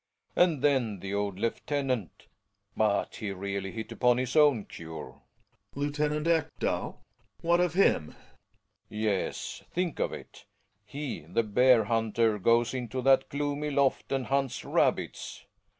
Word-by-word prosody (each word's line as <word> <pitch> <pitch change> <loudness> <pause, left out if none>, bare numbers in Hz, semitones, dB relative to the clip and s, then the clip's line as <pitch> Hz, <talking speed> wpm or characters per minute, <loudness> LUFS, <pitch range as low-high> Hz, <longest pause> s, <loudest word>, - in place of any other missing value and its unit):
And 165 -6 +3
then 125 -8 +2
the 100 +2 -5
old 100 -2 -1
lieutenant! 125 - -2 0.5
But 105 -2 +1
he 105 - -4
really 100 0 -4
hit 110 -1 -6
upon 125 -1 +3
his 130 +2 -2
own 145 -9 +5
cure. 80 -5 -8
Gregers. 70 - -23 0.8
Lieutenant 150 0 0
Ekdal? 160 -2 0 0.4
What 170 +1 +3
of 175 -2 +1
him? 190 - +4
Belling. - - -14 0.7
Yes, 105 -3 -2
think 175 -3 -2
of - - 0
it, - - -10 0.4
he, 140 +4 -5
the 115 +6 +1
bear 120 +2 +4
hunter, 110 -1 +1
goes 115 +4 +3
into 125 0 -3
that 135 0 +4
gloomy 145 +1 -2
loft 140 -2 +1
and 135 -2 0
hunts 135 -2 -1
rabbits - - -1
125 Hz, 135 wpm, -29 LUFS, 105-145 Hz, 0.8 s, own